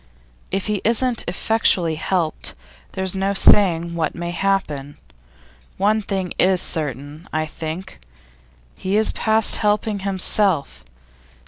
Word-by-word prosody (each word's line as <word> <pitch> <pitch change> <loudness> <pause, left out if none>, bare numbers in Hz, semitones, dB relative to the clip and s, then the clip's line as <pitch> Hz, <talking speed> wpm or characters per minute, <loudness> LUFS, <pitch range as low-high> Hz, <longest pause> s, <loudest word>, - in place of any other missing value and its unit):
If 195 0 -2
he 210 -2 -2
isn't 235 +1 +1
effectually 180 -3 +1
helped, 165 0 -2 0.4
there's 190 0 0
no 195 +1 -1
saying 170 -4 +4
what 165 -2 -2
may 175 0 -4
happen. 165 -7 -2 0.8
One 210 +3 +2
thing 190 -3 -3
is 185 0 +3
certain, 150 - -2
I 155 0 -1
think: 160 - -7 0.8
he 190 +2 -1
is 220 - +3
past 220 -1 +3
helping 210 0 0
himself. 190 - 0
190 Hz, 115 wpm, -20 LUFS, 160-205 Hz, 0.8 s, saying